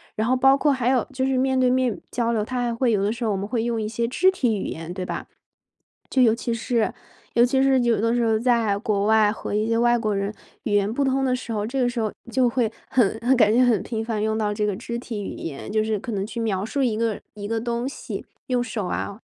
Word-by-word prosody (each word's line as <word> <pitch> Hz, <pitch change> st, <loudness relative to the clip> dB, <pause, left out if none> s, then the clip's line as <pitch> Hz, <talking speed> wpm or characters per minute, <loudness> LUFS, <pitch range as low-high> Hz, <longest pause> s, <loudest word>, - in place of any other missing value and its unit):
然 215 Hz, -, 0 dB
后 255 Hz, -, +3 dB
包 270 Hz, +1 st, +6 dB
括 290 Hz, +1 st, +2 dB
还 255 Hz, -3 st, 0 dB
有 260 Hz, -2 st, +2 dB
就 260 Hz, 0 st, -1 dB
是 265 Hz, 0 st, +1 dB
面 260 Hz, 0 st, +2 dB
对 255 Hz, -, +4 dB
面 255 Hz, -3 st, +1 dB
交 235 Hz, -2 st, 0 dB
流， 215 Hz, -2 st, 0 dB
他 250 Hz, 0 st, -2 dB
还 240 Hz, -1 st, 0 dB
会 240 Hz, 0 st, +1 dB
有 200 Hz, -1 st, +1 dB
的 205 Hz, -, +1 dB
时 235 Hz, +1 st, -3 dB
候 215 Hz, -, +1 dB
我 -, -, 0 dB
们 195 Hz, +1 st, -3 dB
会 225 Hz, 0 st, -1 dB
用 230 Hz, -2 st, -1 dB
一 210 Hz, -, -2 dB
些 230 Hz, +2 st, -1 dB
肢 370 Hz, +9 st, +3 dB
体 245 Hz, -, 0 dB
语 -, -, -3 dB
言， 165 Hz, +2 st, -6 dB
对 185 Hz, -1 st, -4 dB
吧？ -, -, -4 dB, 0.8 s
就 260 Hz, -, +2 dB
尤 225 Hz, -, +5 dB
其 235 Hz, +1 st, -3 dB
是 230 Hz, -1 st, 0 dB, 0.4 s
尤 235 Hz, +1 st, +6 dB
其 265 Hz, +2 st, +2 dB
是 270 Hz, -1 st, +4 dB
有 235 Hz, -3 st, +2 dB
的 230 Hz, +1 st, +2 dB
时 240 Hz, -, +1 dB
候 220 Hz, -1 st, +3 dB
在 230 Hz, -4 st, +2 dB
国 205 Hz, -3 st, 0 dB
外 215 Hz, -1 st, +4 dB
和 210 Hz, -, -5 dB
一 215 Hz, +1 st, +1 dB
些 230 Hz, -, +1 dB
外 240 Hz, +1 st, +4 dB
国 215 Hz, -3 st, -1 dB
人 200 Hz, +1 st, -2 dB, 0.3 s
语 220 Hz, -6 st, -2 dB
言 205 Hz, 0 st, +2 dB
不 280 Hz, +5 st, 0 dB
通 270 Hz, 0 st, +1 dB
的 255 Hz, -, +2 dB
时 250 Hz, -2 st, -6 dB
候， 210 Hz, -1 st, -1 dB
这 265 Hz, +2 st, -2 dB
个 245 Hz, -, +3 dB
时 240 Hz, 0 st, -2 dB
候 215 Hz, -, -1 dB, 0.2 s
就 255 Hz, -1 st, +3 dB
会 235 Hz, -2 st, +1 dB, 0.2 s
很 220 Hz, -4 st, +2 dB
很， 250 Hz, +2 st, +3 dB
感 215 Hz, -3 st, +5 dB
觉 250 Hz, +2 st, +5 dB
很 235 Hz, -6 st, +3 dB
频 225 Hz, -2 st, -3 dB
繁 220 Hz, -2 st, -2 dB
用 220 Hz, 0 st, 0 dB
到 210 Hz, -1 st, 0 dB
这 210 Hz, 0 st, -1 dB
个 205 Hz, -, -1 dB
肢 235 Hz, +3 st, -5 dB
体 220 Hz, -4 st, -5 dB
语 -, -, -5 dB
言， 155 Hz, +5 st, -6 dB
就 215 Hz, 0 st, +2 dB
是 215 Hz, -1 st, 0 dB
可 235 Hz, -, -6 dB
能 195 Hz, -2 st, -2 dB
去 235 Hz, +2 st, -6 dB
描 205 Hz, -3 st, -1 dB
述 275 Hz, +5 st, -2 dB
一 230 Hz, -4 st, +1 dB
个 225 Hz, -2 st, -1 dB
一 205 Hz, -1 st, -6 dB
个 225 Hz, +1 st, -1 dB
东 235 Hz, +2 st, -2 dB
西， 280 Hz, -, -6 dB, 0.2 s
用 250 Hz, -1 st, +1 dB
手 210 Hz, -6 st, -4 dB
啊 200 Hz, +3 st, -4 dB
230 Hz, 300 characters per minute, -23 LUFS, 215-250 Hz, 0.8 s, 包